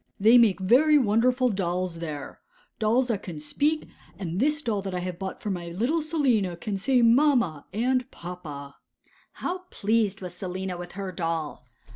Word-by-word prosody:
'They 220 Hz, +4 st, +6 dB
make 215 Hz, -5 st, +4 dB
very 270 Hz, +11 st, +5 dB
wonderful 250 Hz, +1 st, +3 dB
dolls 180 Hz, -3 st, -2 dB
there—dolls 225 Hz, -, -3 dB
that 225 Hz, -5 st, -2 dB
can 165 Hz, -5 st, -7 dB
speak; 295 Hz, -, -1 dB, 0.3 s
and 180 Hz, -2 st, -4 dB
this 295 Hz, +3 st, +1 dB
doll 215 Hz, -4 st, -1 dB
that 190 Hz, -1 st, -4 dB
I -, -, -1 dB
have 180 Hz, -1 st, -5 dB
bought 190 Hz, -1 st, -5 dB
for 210 Hz, -, -1 dB
my 175 Hz, -2 st, -4 dB
little 240 Hz, -, 0 dB
Selina 255 Hz, -, +1 dB
can 205 Hz, +3 st, -4 dB
say 245 Hz, +5 st, +2 dB
"Mamma" 235 Hz, -, +3 dB
and 250 Hz, +4 st, 0 dB
"Papa."' 155 Hz, -6 st, -8 dB, 0.6 s
How 365 Hz, +1 st, -3 dB
pleased 210 Hz, -1 st, 0 dB
was 180 Hz, -2 st, -7 dB
Selina 185 Hz, 0 st, -4 dB
with 175 Hz, 0 st, -8 dB
her 195 Hz, 0 st, -5 dB
doll! 165 Hz, -7 st, -3 dB
200 Hz, 160 wpm, -26 LUFS, 175-250 Hz, 0.6 s, They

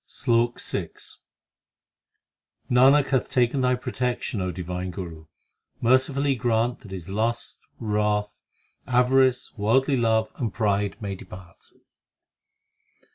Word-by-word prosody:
SLOK 120 Hz, 0 st, +1 dB
VI -, -, -2 dB, 1.8 s
Nanak 135 Hz, +3 st, +5 dB
hath 130 Hz, -2 st, +1 dB
taken 125 Hz, +2 st, +1 dB
Thy 125 Hz, 0 st, +3 dB
protection, 125 Hz, -4 st, -3 dB
O 90 Hz, -, -1 dB
Divine 90 Hz, +1 st, -4 dB
Guru; 85 Hz, -4 st, -8 dB, 0.5 s
merci 130 Hz, +3 st, +3 dB
fully 140 Hz, +1 st, +1 dB
grant 120 Hz, -1 st, 0 dB
That 110 Hz, -, -14 dB
his 95 Hz, -3 st, -7 dB
lust, 115 Hz, +4 st, -2 dB, 0.2 s
wrath, 105 Hz, -1 st, 0 dB, 0.5 s
avarice, 130 Hz, 0 st, +3 dB
worldly 130 Hz, +6 st, +2 dB
love, 110 Hz, -2 st, +1 dB
and 115 Hz, -5 st, -2 dB
pride 100 Hz, -2 st, 0 dB
may 100 Hz, -1 st, -3 dB
depart. 90 Hz, -2 st, -12 dB
115 Hz, 110 wpm, -25 LUFS, 100-125 Hz, 1.8 s, Nanak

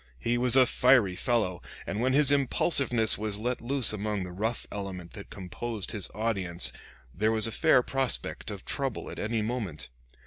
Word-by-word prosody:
He 115 Hz, -, -1 dB
was 125 Hz, +1 st, +2 dB
a 130 Hz, -1 st, +7 dB
fiery 125 Hz, -7 st, +4 dB
fellow, 95 Hz, -4 st, 0 dB, 0.2 s
and 105 Hz, -, -3 dB
when 130 Hz, +1 st, +2 dB
his 145 Hz, 0 st, +5 dB
impulsiveness 135 Hz, -5 st, +2 dB
was 105 Hz, -1 st, -3 dB
let 125 Hz, +4 st, -2 dB
loose 130 Hz, -1 st, +2 dB
among 105 Hz, -1 st, -2 dB
the 90 Hz, -, -7 dB
rough 110 Hz, +6 st, -3 dB
element 95 Hz, -4 st, -6 dB
that 100 Hz, -, -10 dB
composed 100 Hz, +3 st, -5 dB
his 105 Hz, -4 st, -2 dB
audience 100 Hz, -6 st, 0 dB, 0.4 s
there 110 Hz, +8 st, +1 dB
was 110 Hz, -1 st, +1 dB
a 115 Hz, -, -2 dB
fair 125 Hz, +3 st, +4 dB
prospect 135 Hz, -3 st, -2 dB
of 100 Hz, -3 st, -7 dB
trouble 135 Hz, -5 st, -3 dB
at -, -, -8 dB
any 110 Hz, 0 st, -1 dB
moment. 105 Hz, -, -4 dB
110 Hz, 175 wpm, -28 LUFS, 100-125 Hz, 0.4 s, a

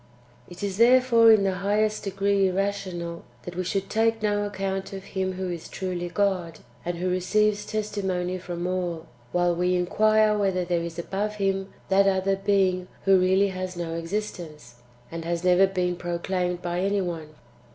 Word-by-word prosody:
1. 175 Hz, -, -12 dB
It -, -, -8 dB
is 195 Hz, -1 st, -2 dB
therefore 235 Hz, -1 st, +6 dB
in 215 Hz, -2 st, +5 dB
the 190 Hz, -1 st, 0 dB
highest 215 Hz, +2 st, +1 dB
degree 195 Hz, 0 st, +1 dB
irrational, 185 Hz, -3 st, -3 dB, 0.2 s
that 175 Hz, -, -8 dB
we 185 Hz, -, -1 dB
should 195 Hz, +2 st, -2 dB
take 225 Hz, 0 st, +1 dB
no 205 Hz, -1 st, +1 dB
account 195 Hz, 0 st, -3 dB
of 195 Hz, -1 st, -6 dB
Him 190 Hz, -1 st, -3 dB
who 185 Hz, -1 st, -3 dB
is 170 Hz, -2 st, -7 dB
truly 180 Hz, -2 st, -4 dB
God, 180 Hz, -4 st, 0 dB, 0.3 s
and 175 Hz, 0 st, -3 dB
who 180 Hz, +2 st, -2 dB
receives 205 Hz, +3 st, +1 dB
testimony 190 Hz, -4 st, -2 dB
from 175 Hz, -1 st, -5 dB
all, 175 Hz, -3 st, -2 dB, 0.3 s
while 175 Hz, 0 st, +2 dB
we 180 Hz, +1 st, +1 dB
inquire 215 Hz, +4 st, +3 dB
whether 190 Hz, -3 st, 0 dB
there 175 Hz, -1 st, 0 dB
is 170 Hz, -1 st, -6 dB
above 200 Hz, +4 st, -3 dB
Him 195 Hz, -1 st, -1 dB, 0.2 s
that 195 Hz, +1 st, +4 dB
[other 195 Hz, 0 st, +2 dB
being] 190 Hz, -2 st, +1 dB, 0.2 s
who 195 Hz, -1 st, +6 dB
really 190 Hz, +2 st, +3 dB
has 185 Hz, -1 st, -5 dB
no 170 Hz, -1 st, -3 dB
existence, 165 Hz, -, -5 dB, 0.3 s
and 165 Hz, 0 st, -5 dB
has 170 Hz, +1 st, -2 dB
never 180 Hz, +1 st, +5 dB
been 180 Hz, -2 st, -1 dB
proclaimed 180 Hz, +1 st, -2 dB
by 175 Hz, 0 st, -2 dB
any 200 Hz, +1 st, +1 dB
one. 160 Hz, -4 st, -5 dB
185 Hz, 170 wpm, -25 LUFS, 175-200 Hz, 0.3 s, therefore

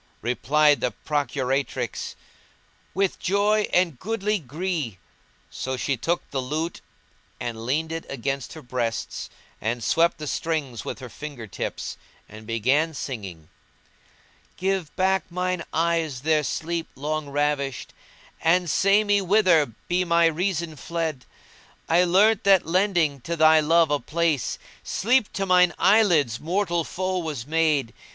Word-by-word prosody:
Replied 145 Hz, +5 st, +3 dB
the 125 Hz, -, 0 dB
procuratrix, 135 Hz, -5 st, -2 dB, 0.8 s
"With 195 Hz, 0 st, 0 dB
joy 205 Hz, +2 st, +2 dB
and 175 Hz, -8 st, +2 dB
goodly 210 Hz, 0 st, -1 dB
gree;" 155 Hz, -, -3 dB, 0.5 s
so 130 Hz, 0 st, -4 dB
she 130 Hz, +3 st, 0 dB
took 165 Hz, +8 st, -2 dB
the 135 Hz, -, -1 dB
lute; 155 Hz, +6 st, -3 dB, 0.6 s
and 115 Hz, -1 st, -5 dB
leaned 160 Hz, +5 st, 0 dB
it 165 Hz, 0 st, -5 dB
against 135 Hz, 0 st, -3 dB
her 155 Hz, -2 st, -10 dB
breasts 120 Hz, -2 st, -3 dB, 0.3 s
and 115 Hz, +2 st, -2 dB
swept 165 Hz, +7 st, +2 dB
the 155 Hz, -, -6 dB
strings 145 Hz, -7 st, -2 dB
with -, -, -5 dB
her 130 Hz, -, -6 dB
finger 140 Hz, -2 st, -8 dB
tips, 100 Hz, -, -5 dB, 0.3 s
and 110 Hz, +1 st, -12 dB
began 135 Hz, +8 st, +1 dB
singing:— 95 Hz, -, -6 dB, 1.1 s
"Give 190 Hz, -3 st, -1 dB
back 190 Hz, -2 st, +1 dB
mine 180 Hz, 0 st, -2 dB
eyes 165 Hz, -5 st, 0 dB
their 155 Hz, +1 st, +2 dB
sleep 165 Hz, +3 st, -3 dB
long 150 Hz, +1 st, -3 dB
ravished 140 Hz, -2 st, -1 dB, 0.3 s
* -, -, -27 dB
And 175 Hz, +1 st, +3 dB
say 200 Hz, +2 st, +4 dB
me 205 Hz, -1 st, +2 dB
whither 185 Hz, -6 st, +4 dB, 0.2 s
be 180 Hz, +1 st, +1 dB
my 170 Hz, -1 st, +3 dB
reason 165 Hz, -1 st, -1 dB
fled: 160 Hz, -6 st, -3 dB, 0.6 s
I 175 Hz, +2 st, +4 dB
learnt 200 Hz, +4 st, +4 dB
that 195 Hz, -2 st, +5 dB
lending 170 Hz, -5 st, +1 dB
to 170 Hz, +7 st, -3 dB
thy 160 Hz, 0 st, +6 dB
love 165 Hz, 0 st, +3 dB
a 145 Hz, -, +2 dB
place 160 Hz, -5 st, 0 dB
* -, -, -25 dB
Sleep 235 Hz, +2 st, +1 dB
to 195 Hz, -, -1 dB
mine 180 Hz, -1 st, +4 dB
eyelids 175 Hz, -, +4 dB
mortal 175 Hz, 0 st, 0 dB
foe 185 Hz, +2 st, -2 dB
was 150 Hz, -8 st, -4 dB
made. 155 Hz, -5 st, +1 dB
160 Hz, 140 wpm, -24 LUFS, 140-180 Hz, 1.1 s, thy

